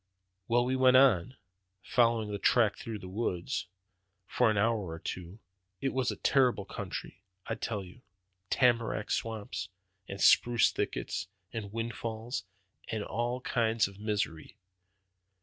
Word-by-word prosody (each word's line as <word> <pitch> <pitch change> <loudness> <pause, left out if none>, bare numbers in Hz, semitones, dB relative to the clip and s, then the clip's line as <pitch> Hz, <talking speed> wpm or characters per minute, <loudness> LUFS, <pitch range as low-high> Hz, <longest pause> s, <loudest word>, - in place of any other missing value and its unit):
"Well, 120 +1 +3
we 130 +1 0
went 130 0 +6
on, 130 -3 +4 0.5
following 115 -3 +2
that 100 - -4
track 115 -4 +4
through 115 -2 -6
the 95 - -9
woods, 95 -3 -2 0.6
for 120 +4 +2
an 110 - +1
hour 110 -2 +1
or 80 - -5
two. 90 +3 -6 0.4
It 135 - -1
was 130 -1 +1
a - - -2
terrible 125 -7 +2
country, 100 - -6 0.2
I - - -2
tell 105 -4 -3
you: 90 0 -14 0.5
tamarack 115 -4 +2
swamps, 100 -7 -3 0.4
and 100 - -6
spruce 120 +3 +5
thickets, - - -3 0.3
and 105 -4 -5
windfalls, 115 0 -4 0.4
and 110 -2 -2
all 120 +4 -2
kinds 115 -3 +1
of 100 0 -13
misery. 105 -7 -3
110 Hz, 135 wpm, -31 LUFS, 100-120 Hz, 0.6 s, went